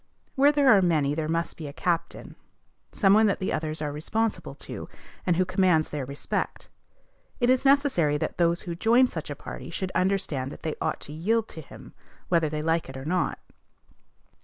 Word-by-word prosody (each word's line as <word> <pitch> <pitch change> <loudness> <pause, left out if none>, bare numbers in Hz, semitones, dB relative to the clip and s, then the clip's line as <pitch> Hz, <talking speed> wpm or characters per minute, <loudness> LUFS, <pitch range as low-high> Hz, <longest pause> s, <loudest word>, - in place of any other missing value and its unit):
Where 280 +2 +5
there 290 -2 +2
are 195 - +5
many 155 -5 +2
there 155 0 -2
must 165 +1 -2
be 155 - -6
a 140 - -8
captain, 170 +2 -2 0.6
some 195 -2 +4
one 215 +1 +5
that 200 - +1
the 190 - -2
others 155 0 -2
are 145 - -2
responsible 220 +9 -2
to, - - -8 0.4
and 175 - +3
who 185 - +3
commands 180 -4 +2
their 145 -4 -4
respect. 140 +1 -4 0.7
It 245 0 +3
is 255 +1 +1
necessary 270 - +3
that - - -4
those 170 0 +2
who 175 - -5
join 235 +8 +4
such - - -6
a - - -4
party - - -8
should 190 -1 -4
understand 180 -9 0
that - - -11
they 160 -2 -2
ought - - -1
to 150 - -9
yield 220 +8 0
to 160 - -8
him, 140 - -13 0.4
whether 165 -3 +2
they 150 0 -3
like 165 -2 0
it 135 - -8
or 130 - -7
not. 180 +2 0
170 Hz, 195 wpm, -26 LUFS, 155-205 Hz, 0.7 s, Where